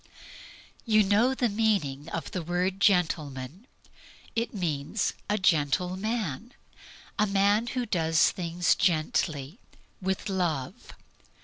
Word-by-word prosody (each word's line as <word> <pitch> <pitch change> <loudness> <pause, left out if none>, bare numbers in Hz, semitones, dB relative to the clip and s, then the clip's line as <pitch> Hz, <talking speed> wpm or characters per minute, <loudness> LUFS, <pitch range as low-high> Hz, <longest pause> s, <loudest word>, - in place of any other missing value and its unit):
You 215 -2 +4
know 215 +7 +3
the 245 - +1
meaning 200 -11 0
of 165 - -5
the 180 - -3
word 180 +3 -1
"gentleman." 160 - 0 0.7
It 230 +1 -1
means 170 0 -2 0.2
a 210 - +2
gentle 180 -1 +1
man 215 - -3 0.6
a 210 - +3
man 200 +3 +2
who 250 0 -2
does 165 -6 +2
things 175 -1 +1
gently, 155 - 0 0.4
with 190 0 -2
love. 170 -9 -3
185 Hz, 110 wpm, -28 LUFS, 160-210 Hz, 0.7 s, You